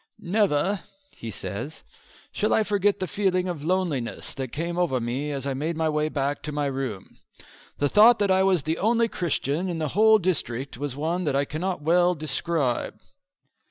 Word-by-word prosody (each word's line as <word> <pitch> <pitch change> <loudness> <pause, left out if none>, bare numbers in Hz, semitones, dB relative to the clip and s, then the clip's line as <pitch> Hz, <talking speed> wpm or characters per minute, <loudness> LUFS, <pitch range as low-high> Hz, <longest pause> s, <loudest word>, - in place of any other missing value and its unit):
"Never," 195 -2 +1 0.3
he 115 - -8
says, 115 +7 -6 0.5
"shall 215 - +1
I 220 - +3
forget 205 -1 +1
the 185 - -1
feeling 185 +1 0
of 170 -5 -4
loneliness 165 -8 -1
that 130 -4 -5
came 170 +3 -3
over 155 -8 +1
me 125 +5 -2
as 140 -2 -4
I 140 - -1
made 155 +5 -2
my 160 -1 +1
way 150 0 0
back 140 -1 -2
to 150 - -4
my 145 0 -1
room. 130 -8 -4 0.6
The 145 - +2
thought 220 - +7
that 205 -2 +1
I 190 0 +4
was 190 -5 +2
the 160 +3 -2
only 230 +2 +3
Christian 170 -2 -1
in 170 - -3
the 155 -2 -2
whole 220 +4 +5
district 140 - -2
was 140 +1 -4
one 165 +5 -1
that 145 -3 0
I 140 +1 +2
cannot 170 +2 -3
well 175 +3 +3
describe." 150 -3 -1
160 Hz, 185 wpm, -25 LUFS, 140-185 Hz, 0.6 s, thought